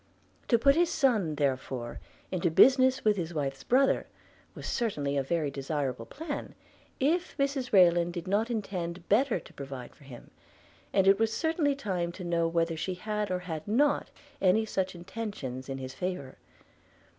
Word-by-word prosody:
To 235 Hz, -, +5 dB
put 275 Hz, +4 st, +5 dB
his 340 Hz, +3 st, +3 dB
son 220 Hz, -, +2 dB
therefore 130 Hz, -4 st, -2 dB, 0.3 s
into 180 Hz, -2 st, +1 dB
business 260 Hz, -, +5 dB
with 210 Hz, -1 st, +4 dB
his 170 Hz, -2 st, -4 dB
wife's 135 Hz, -2 st, -2 dB
brother 265 Hz, -, +3 dB, 0.5 s
was -, -, -8 dB
certainly 150 Hz, -, -1 dB
a 140 Hz, -, +2 dB
very 150 Hz, +1 st, -1 dB
desirable 140 Hz, -2 st, -3 dB
plan, 300 Hz, 0 st, -6 dB, 0.4 s
if 335 Hz, +7 st, 0 dB
Mrs 275 Hz, -2 st, -1 dB
Rayland 175 Hz, -3 st, +5 dB
did 175 Hz, +1 st, -6 dB
not 210 Hz, +5 st, +1 dB
intend 185 Hz, -6 st, -4 dB
better 230 Hz, 0 st, +3 dB
to -, -, -16 dB
provide 135 Hz, -3 st, -8 dB
for 145 Hz, -, -19 dB
him; 125 Hz, -3 st, -12 dB, 0.6 s
and 195 Hz, -1 st, +3 dB
it 195 Hz, +1 st, +6 dB
was 225 Hz, -1 st, +2 dB
certainly 320 Hz, 0 st, +1 dB
time 185 Hz, -10 st, -2 dB
to 185 Hz, -, -8 dB
know 170 Hz, -1 st, +1 dB
whether 165 Hz, 0 st, 0 dB
she 180 Hz, +4 st, -3 dB
had 210 Hz, +2 st, -3 dB
or 185 Hz, -, 0 dB
had 160 Hz, -4 st, -6 dB
not 280 Hz, +7 st, +2 dB, 0.3 s
any 200 Hz, +4 st, +4 dB
such 190 Hz, -3 st, -2 dB
intentions 170 Hz, -, -6 dB
in 135 Hz, -, -3 dB
his 130 Hz, -1 st, -6 dB
favour. 140 Hz, -4 st, -5 dB
185 Hz, 165 wpm, -29 LUFS, 155-230 Hz, 0.6 s, it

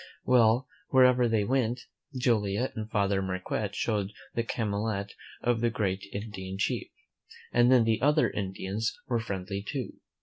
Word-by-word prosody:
Well, 125 Hz, +1 st, +4 dB, 0.2 s
wherever 125 Hz, -2 st, +5 dB
they 110 Hz, -2 st, +2 dB
went, 120 Hz, +1 st, 0 dB, 0.4 s
Joliet 115 Hz, -1 st, +1 dB
and 110 Hz, 0 st, -5 dB
Father 100 Hz, -2 st, +1 dB
Marquette 95 Hz, +2 st, -3 dB
showed 105 Hz, -2 st, -1 dB, 0.2 s
the 115 Hz, -, 0 dB
calumet 105 Hz, -3 st, -2 dB, 0.3 s
of 120 Hz, -2 st, +1 dB
the 120 Hz, -, +3 dB
great 100 Hz, -4 st, -1 dB
Indian 95 Hz, -2 st, -6 dB
chief, 100 Hz, -, -1 dB, 0.6 s
and 120 Hz, +1 st, +5 dB
then 125 Hz, -3 st, +6 dB
the 110 Hz, -1 st, +1 dB
other 150 Hz, +3 st, +4 dB
Indians 100 Hz, +2 st, -3 dB
were 120 Hz, -2 st, +1 dB
friendly 100 Hz, -2 st, -4 dB
too. 130 Hz, +5 st, -5 dB
110 Hz, 140 wpm, -29 LUFS, 100-120 Hz, 0.6 s, then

